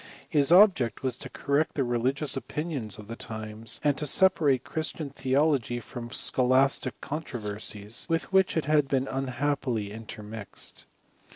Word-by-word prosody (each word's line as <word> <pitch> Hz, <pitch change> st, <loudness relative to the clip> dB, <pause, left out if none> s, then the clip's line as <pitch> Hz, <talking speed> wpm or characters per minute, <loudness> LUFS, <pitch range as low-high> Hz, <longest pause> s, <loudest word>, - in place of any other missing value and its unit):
His 145 Hz, +1 st, +3 dB
object 175 Hz, -, +5 dB
was 130 Hz, -2 st, +1 dB
to -, -, -7 dB
correct 150 Hz, +3 st, 0 dB
the 140 Hz, -, +1 dB
religious 130 Hz, +5 st, 0 dB
opinions 135 Hz, -, -4 dB
of 105 Hz, -, -11 dB
the 115 Hz, -, -6 dB
times, 110 Hz, -1 st, -3 dB
and 145 Hz, -2 st, +3 dB
to 150 Hz, -, 0 dB
separate 145 Hz, -6 st, +4 dB
Christian 155 Hz, -2 st, -3 dB
theology 135 Hz, -2 st, +1 dB
from 120 Hz, 0 st, -8 dB
scholastic 130 Hz, +1 st, +2 dB
controversies, 110 Hz, -7 st, -3 dB
with 165 Hz, +3 st, -1 dB
which 190 Hz, -3 st, +3 dB
it 160 Hz, -, 0 dB
had 150 Hz, -2 st, +3 dB
been 135 Hz, -1 st, 0 dB
unhap 135 Hz, +2 st, -1 dB
pily 110 Hz, -5 st, -2 dB
intermixed. 105 Hz, -1 st, -8 dB
135 Hz, 145 wpm, -27 LUFS, 115-150 Hz, -, object